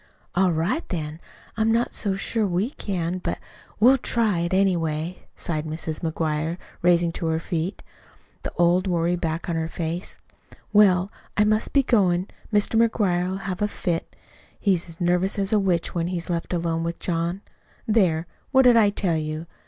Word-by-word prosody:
"All 185 0 +3
right, 170 - 0
then. 155 -3 -4 0.4
I'm 220 +1 +2
not 235 +2 +1
so 200 -3 0
sure 215 +2 -1
we 190 +7 0
can, 185 - -3
but - - -3 0.4
we'll 255 +5 +6
try 220 -7 +1
it, 170 0 -1
anyway," 175 -3 0
sighed 155 -2 -3
Mrs. 155 0 -4
McGuire, 160 0 -1 0.2
rising 175 -1 +3
to 165 - -3
her 160 0 +1
feet, 170 +3 -3 0.6
the - - -5
old 175 +2 +3
worry 175 -1 +1
back 165 -1 -3
on 170 - -1
her 160 0 -1
face. 170 +2 -4 0.6
"Well, 195 -2 +5 0.3
I 210 - +5
must 215 +1 +1
be 275 - +4
goin'. 190 -7 +2 0.2
Mr. 210 +2 +3
McGuire'll 190 -4 0
have 190 0 -4
a 210 - +3
fit. 175 -4 -3 0.4
He's 180 -4 +1
as 165 - -11
nervous 180 +2 +1
as 200 +2 0
a 215 - +5
witch 180 -4 0
when 170 -1 -1
he's 175 0 -3
left 170 -1 -2
alone 165 -2 -1
with 170 0 -3
John. 170 +2 -2 0.5
There! 180 -7 +2 0.2
What 265 -1 +5
did 245 -2 +6
I 210 -3 +6
tell 185 -5 0
you?" 155 +1 -4
175 Hz, 170 wpm, -24 LUFS, 165-200 Hz, 0.6 s, we'll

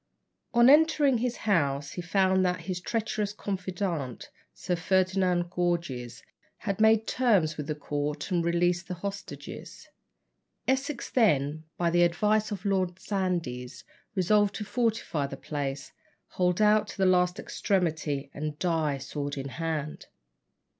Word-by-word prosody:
On 235 0 +6
entering 295 -3 +5
his 245 0 -1
house, 145 -8 +1
he 180 - -5
found 190 +2 +2
that 180 0 0
his 180 -2 -4
treacherous 215 -1 -2
confidant, 180 - -4 0.2
Sir 180 - -2
Ferdinand 185 -1 +1
Gorges, 165 -10 -2 0.3
had 205 0 -3
made 220 0 +5
terms 200 -12 +2
with 150 -1 -5
the 155 - -2
court 145 +2 -3
and 175 -2 +2
released 175 +1 +1
the 180 - -4
hostages. 200 +2 -7 0.8
Essex 265 0 -1
then, 155 - +2
by 170 -1 +1
the 175 +1 +3
advice 210 +5 +2
of 205 -2 -6
Lord 185 -3 0
Sandys, 175 -12 -3 0.3
resolved 205 +2 +3
to 210 - -4
fortify 225 - -1
the 135 - -7
place, 140 -2 -4 0.4
hold 180 +2 +1
out 210 0 +4
to - - -9
the 190 - +2
last 180 0 +3
extremity, 160 -10 -1
and 150 0 -4
die 160 -5 0
sword 145 +1 -5
in 135 0 -4
hand. 155 0 -4
180 Hz, 135 wpm, -28 LUFS, 150-205 Hz, 0.8 s, On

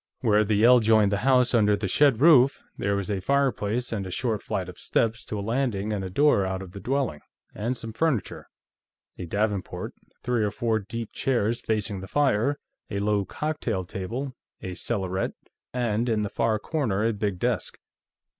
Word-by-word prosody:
Where 110 -3 +4
the 105 0 +1
ell 125 +1 +8
joined 110 -2 +4
the 100 - +1
house 125 -1 +4
under 105 -3 +4
the 100 0 -3
shed 135 +3 +3
roof, 140 -4 +6
there 100 0 0
was 100 +1 -2
a 100 -2 -1
fireplace, 125 -2 0
and 100 -3 -3
a - - -6
short 110 +2 -1
flight 90 -2 -3
of 90 - -10
steps 115 0 0
to 105 - -4
a 100 - -4
landing 115 -4 -1
and 100 -2 -2
a 95 - -4
door 140 +1 +3
out 95 0 -3
of 90 - -11
the 100 - -8
dwelling, 130 - -1 0.3
and 120 +4 -2
some 115 -1 -6
furniture 155 -5 -1 0.7
a 90 - -5
davenport, 105 +1 -2 0.3
three 120 -3 +1
or 105 - +1
four 110 +1 0
deep 115 +2 -6
chairs 120 -4 0
facing 105 -2 -1
the 95 - -8
fire, 140 +1 +2 0.3
a 100 - -3
low 100 0 +1
cocktail 120 - -3
table, 115 +10 -5 0.3
a 95 - -6
cellarette, 95 -1 -2 0.4
and, 120 -1 0
in 110 -2 +1
the 105 - -2
far 110 +1 +1
corner, 110 -5 -1
a 115 - +2
big 105 -3 -2
desk. 120 +2 -2
110 Hz, 185 wpm, -26 LUFS, 100-125 Hz, 0.7 s, ell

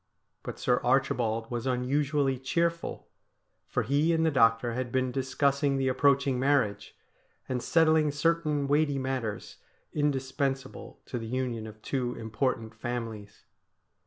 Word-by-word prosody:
But - - -7
Sir 125 0 +1
Archibald 120 -3 +1
was 120 +1 -3
unusually 135 +1 +1
cheerful, 170 +5 -1 0.6
for - - -1
he 150 +4 +2
and 165 0 +2
the 160 - +3
doctor 115 -2 +3
had 125 0 -3
been 130 0 0
discussing 135 +2 +1
the 135 -1 +1
approaching 135 -1 +2
marriage, 135 -6 +1 0.5
and 125 -1 -2
settling 160 +1 +3
certain 150 -1 +1
weighty 145 0 +2
matters 130 -6 -3 0.4
indispensable 135 -2 -2
to 125 - -4
the 115 - -6
union 120 -2 -2
of 110 0 -13
two 125 -3 -2
important 115 0 -2
families. 115 -3 -6
130 Hz, 130 wpm, -29 LUFS, 120-145 Hz, 0.6 s, the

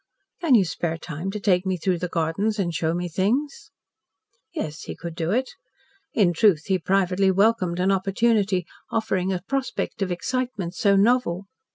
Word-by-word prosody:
"Can 330 -8 +4
you 200 -5 +5
spare 165 -1 -2
time 165 +2 -5
to 210 +2 -4
take 185 -3 +2
me 190 -1 -1
through 180 +1 0
the 180 - -2
gardens 170 +6 -1
and 175 -4 -1
show 165 0 0
me 175 0 -2
things?" 230 - -1 0.8
Yes, 155 - -5
he - - -6
could 170 +1 -7
do 165 0 -3
it. 255 +6 0 0.6
In 185 -5 +3
truth, 170 -3 +4
he 190 -2 +1
privately 190 +1 +2
welcomed 190 -3 +2
an 190 +2 +2
opportunity 195 -1 +1 0.2
offering 190 -4 0
a 180 -2 -3
prospect 270 -5 -2
of 190 -2 0
excitement 210 -2 -2
so 200 +1 +3
novel. 200 -3 +2
190 Hz, 170 wpm, -24 LUFS, 175-215 Hz, 0.8 s, you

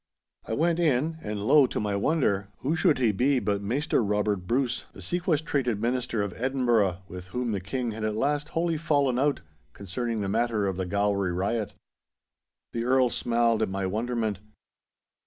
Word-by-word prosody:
I - - -2
went 165 +6 +1
in, 160 0 +1
and 105 -4 -4
lo! 140 +3 +6
to - - -3
my 105 -1 -1
wonder, 100 -5 +1
who 150 +5 0
should 160 - +3
he 120 -4 +3
be 130 +7 +2
but 100 -3 0
Maister 125 +5 0
Robert 105 -2 0
Bruce, 125 +1 0
the - - -13
sequestrated 150 - 0
minister 120 -1 -1
of 100 -3 -4
Edinburgh, 115 -8 +1
with 90 -1 -9
whom 125 +4 -2
the 100 - -1
King 115 +6 -3
had 110 0 -6
at 110 0 -1
last 145 +5 0
wholly 165 -1 +1
fallen 145 -5 +1
out 145 +1 +1 0.3
concerning 115 +3 -3
the 100 - -2
matter 110 0 +1
of 95 -1 -1
the 95 0 -3
Gowrie 100 -1 +1
riot. 100 +4 -2 1.0
The 115 - -2
Earl 125 0 +3
smiled 115 -1 +1
at 110 - +1
my 95 0 -2
wonderment. 110 0 -1
115 Hz, 175 wpm, -27 LUFS, 100-135 Hz, 1.0 s, lo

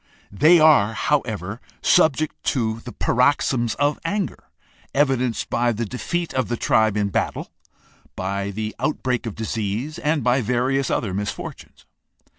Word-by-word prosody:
They 155 - +5
are, 145 -9 +5
however, 110 - -1 0.2
subject 155 0 +2
to 115 -3 0 0.2
paroxysms 125 -2 +2
of 145 +1 0
anger, 195 +3 -3 0.5
evidenced 130 -4 +1
by 120 0 +2
the 115 +2 -3
defeat 170 +9 -3
of 130 - 0
the 120 - -2
tribe 110 -2 +2
in 100 -1 +1
battle, - - -2 0.6
by 100 +1 -2
the 110 +2 -4
outbreak 130 -5 -1
of 110 - -5
disease, 110 +6 -3
and 150 -1 0
by 125 +2 +3
various 125 +4 0
other 100 -5 -1
mis 105 +2 -2
fortunes. - - -9
120 Hz, 135 wpm, -22 LUFS, 110-145 Hz, 0.6 s, They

